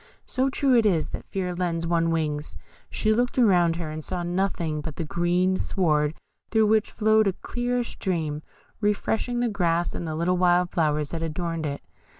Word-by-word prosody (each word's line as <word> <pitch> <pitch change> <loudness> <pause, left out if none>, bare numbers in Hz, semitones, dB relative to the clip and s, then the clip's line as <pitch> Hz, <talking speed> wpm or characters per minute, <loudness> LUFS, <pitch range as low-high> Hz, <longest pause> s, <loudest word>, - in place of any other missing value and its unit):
So 260 +1 0
true 270 -1 +2
it 230 - +5
is 165 -6 +1
that - - -7
fear 185 -2 -2
lends 170 -2 -1
one 165 0 +1
wings. 155 -2 -2 0.3
She 215 - +1
looked 245 +3 0
around 180 -8 +4
her, 165 -2 -4
and 155 0 -6
saw 180 +1 -3
nothing 175 -4 -1
but 150 0 -6
that 165 - -4
green 175 +3 +1
sward, 150 -4 +1 0.3
through 220 -1 +3
which 215 0 +2
flowed 220 -1 +3
a 195 - +1
clear 245 +4 -2
stream, 160 -9 -3 0.4
refreshing 220 +3 0
the 245 - +2
grass 175 -5 0
and 170 - -4
the 155 - -3
little 175 +3 +1
wild 180 0 +3
flowers 150 -3 0
that 165 - -3
adorned 165 0 -2
it. 140 0 -5
175 Hz, 180 wpm, -25 LUFS, 165-210 Hz, 0.4 s, it